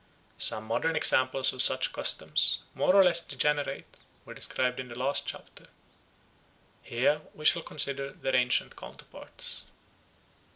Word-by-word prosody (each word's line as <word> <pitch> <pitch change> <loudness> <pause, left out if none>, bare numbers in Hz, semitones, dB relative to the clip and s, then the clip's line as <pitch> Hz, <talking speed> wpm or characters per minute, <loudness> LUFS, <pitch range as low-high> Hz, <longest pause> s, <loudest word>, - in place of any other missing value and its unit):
Some 110 - +1
modern 140 +9 -1
examples 130 +1 +2
of 130 - -1
such - - +3
customs, - - 0
more 185 - +1
or 195 - +8
less 170 -2 +4
degenerate, 145 -2 -2 0.3
were - - -10
described 125 0 -1
in 130 - -6
the 120 -1 -10
last 135 +3 -1
chapter. - - -9 1.1
Here 130 +5 0
we 155 - -11
shall 170 - +4
consider 140 -3 -3
their 135 - -3
ancient 125 -1 +1
counterparts. - - -10
135 Hz, 130 wpm, -28 LUFS, 125-150 Hz, 1.1 s, or